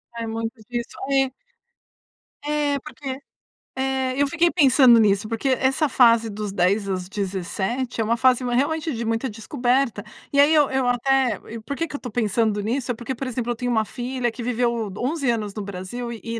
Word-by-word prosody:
É 230 -1 -4
muito 225 +1 -3
difícil, 235 +2 -6
é. 270 -1 +2 1.1
É, 295 -1 0
porque 275 -3 -6 0.6
é, 265 -1 0
eu - - +5
fiquei 340 +4 +2
pensando 265 -7 +6
nisso, 200 0 +2
porque 230 +4 -2
essa 270 +4 +2
fase 230 -3 +5
dos 210 +1 -5
dos 200 - -4
10 195 +3 +1
aos 185 -1 -3
17, 200 +6 -3
é - - +3
uma 230 +2 +1
fase 255 +1 +3
ma 245 -1 -1
realmente, 315 +3 0
de 235 0 -3
muita 230 +3 -1
descoberta, 245 0 0 0.3
e 280 - +2
aí 295 +3 +6
eu 295 -3 +4
eu 265 -2 +1
até 250 -1 +2
e 230 - -5
por 280 +6 -5
que 330 - -1
que - - -11
eu - - -1
estou 245 -5 -8
pensando 215 -1 +1
nisso? 245 +4 -1
É - - -3
porque, 240 +3 -5
por 265 +2 -5
exemplo, 240 -1 -2
eu - - -2
tenho 245 +2 -3
uma 220 -2 +2
filha 245 +1 -3
que 245 - -8
viveu 235 -2 0
11 275 0 -1
anos 215 -4 -1
no 210 - -5
Brasil 200 +5 -6
e 230 0 -5
240 Hz, 200 wpm, -23 LUFS, 220-265 Hz, 1.1 s, pensando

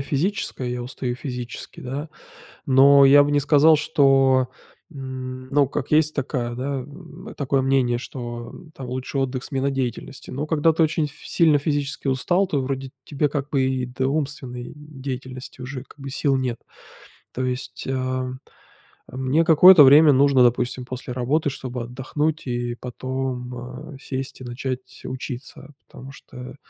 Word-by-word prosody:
физическая, 140 -2 -2
я 125 0 -3
устаю 125 0 -4
физически, 125 -2 -7
да, 140 +5 -5 0.6
но 140 +1 +7
я 145 +1 +8
бы 145 - -1
не 145 - +3
сказал, 150 +2 +5
что, 135 -4 +3 0.4
м, 130 -2 -7
ну, 140 0 +3
как 140 0 -4
есть 155 0 +3
такая, 125 -4 -2
да, 135 +3 -3
м, 165 - -11
такое 135 -1 0
мнение, 130 -3 +2
что 120 -2 -7 0.2
там 135 - -7
лучший 130 +2 -3
отдых- 130 -1 -2
смена 135 0 -1
деятельности. 130 0 -4
Но 140 +4 -3
когда 160 +1 +2
ты 165 +1 +3
очень 155 0 +1
ф 145 - -7
сильно 160 -4 +3
физически 145 -1 -2
устал, 175 +9 +2
то 150 -7 -1
вроде 135 0 -4
тебе, 145 0 -1
как 145 0 -3
бы, 135 -3 +1
и 130 -1 0
до 130 +1 -2
умственной 135 -4 -4
деятельности 130 -4 -8
уже, 130 0 -6
как 150 - -19
бы, 135 0 -7
сил 140 0 +1
нет. 125 -3 -2 0.7
То 130 - -3
есть, 125 +1 -4
ам, 130 -1 -2 0.7
а, 130 - -10
мне 130 +5 +2
какое-то 165 0 +8
время 145 +2 +8
нужно 135 -1 +5
допустим 125 +1 +1
после 130 0 -7
работы 135 +5 0
чтобы 125 -3 -5
отдохнуть 140 +5 -3
и 120 -1 -2
потом, 125 0 -4
а, 130 +5 -9
сесть 135 0 -5
и - - -9
начать 130 +1 -6
учиться, 130 +2 -7
потому 135 +2 -11
что, 125 -2 -11
135 Hz, 155 wpm, -23 LUFS, 125-145 Hz, 0.7 s, я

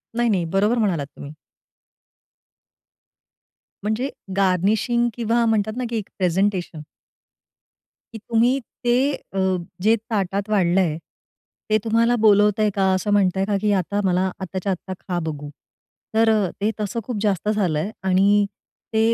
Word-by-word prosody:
नाही-नाही 220 -8 +1
बरोबर 205 +6 +2
म्हणालात 180 -11 0
तुम्ही. 145 - -9 2.5
म्हणजे 220 +6 -1 0.3
गार्निशिंग 205 +6 +2
किंवा 235 +1 +1
म्हणतात 215 -1 +1
ना 255 - -2
की 230 - -2
एक 205 - -5
प्रेझेंटेशन. 185 -2 0 1.3
की - - -6
तुम्ही 235 +4 +2 0.2
ते 240 - +3 0.2
अ, 195 - -7 0.4
जे 220 +4 +4
ताटात 205 -2 -2
वाढलंय, 180 -5 +2 0.7
ते 215 - +4
तुम्हाला 230 +2 +3
बोलवतंय 210 0 +4
का? 190 -1 +3
असं 195 +2 -1
म्हणताय 195 -1 +2
का 205 -1 0
की 210 -1 +2
आता 200 +3 -2
मला 185 0 +1
आत्ताच्या 190 +1 -3
आत्ता 185 +1 -5
खा 180 -2 -3
बघू. 145 -2 -5 0.7
तर 225 0 +4 0.3
ते 215 +2 +2
तसं 210 +3 -2
खूप 240 0 -4
जास्त 205 -1 0
झालं 185 -8 +1
आहे 195 +8 -3 0.2
आणि 200 +2 +4 0.5
ते 220 - +2
205 Hz, 130 wpm, -22 LUFS, 185-220 Hz, 2.5 s, जे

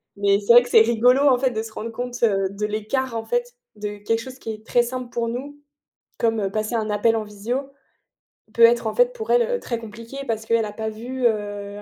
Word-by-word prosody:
mais 200 0 +2
c'est 210 +3 +4
vrai 245 - +9
que 245 - -9
c'est 225 - +7
rigolo 240 +4 +4
en 255 -3 +5
fait 260 -1 +1
de 220 -1 -3
se 225 -1 -10
rendre 230 - -5
compte 245 +1 -5
de 200 -1 +1
l'écart 230 +4 -2
en 225 - -3
fait 485 0 -2 0.2
de 210 0 -5
quelque 225 +2 -1
chose 260 +2 -9
qui 225 - -5
est 215 0 -10
très 240 - +3
simple 250 0 -5
pour 235 -1 -2
nous 280 +5 -6 0.6
comme 220 -4 0
passer 215 +2 -2
un 220 -1 -1
appel 210 +2 +2
en 220 - -1
visio, 230 +7 -4 0.8
peut 235 - +4
être 235 -1 +5
en - - -3
fait - - +3
pour 445 -3 -7
elle 485 0 +2
très 235 - -3
compliquée 230 +3 -10
parce 220 -1 -2
qu'elle 230 -1 +2
a 210 - -7
pas 220 0 -3
vu, 245 +4 -5
heu, 205 -2 -4
230 Hz, 230 wpm, -22 LUFS, 215-250 Hz, 0.8 s, vrai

